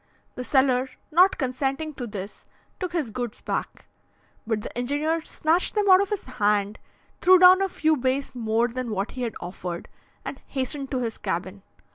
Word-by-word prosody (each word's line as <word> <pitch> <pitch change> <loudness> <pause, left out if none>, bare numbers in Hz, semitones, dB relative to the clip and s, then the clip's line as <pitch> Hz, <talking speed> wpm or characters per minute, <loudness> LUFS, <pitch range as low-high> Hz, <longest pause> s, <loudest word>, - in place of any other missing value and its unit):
The 250 - -5
seller, 260 0 +2 0.2
not 360 +5 +5
consenting 275 +3 -2
to 250 -3 -6
this, 200 -1 -8 0.3
took 365 -3 -3
his 300 -10 -1
goods 240 0 -5
back; - - -4 0.6
but 220 -2 0
the - - -8
engineer 290 +7 0
snatched 320 +5 0
them 415 -1 +2
out 370 +1 +8
of 400 - -1
his 415 -2 -2
hand, 210 -4 0 0.4
threw 370 +1 +7
down 365 +1 +8
a 390 - +1
few 315 -3 +2
beis 265 +1 -1
more 230 -1 +1
than 250 0 -4
what 200 -1 -2
he 255 - -7
had 235 -3 -2
offered, 175 -1 -6 0.4
and 270 - -6
hastened 270 +1 -3
to 255 -2 -1
his 225 -1 -4
cabin. 185 +3 -3
255 Hz, 175 wpm, -25 LUFS, 225-315 Hz, 0.6 s, out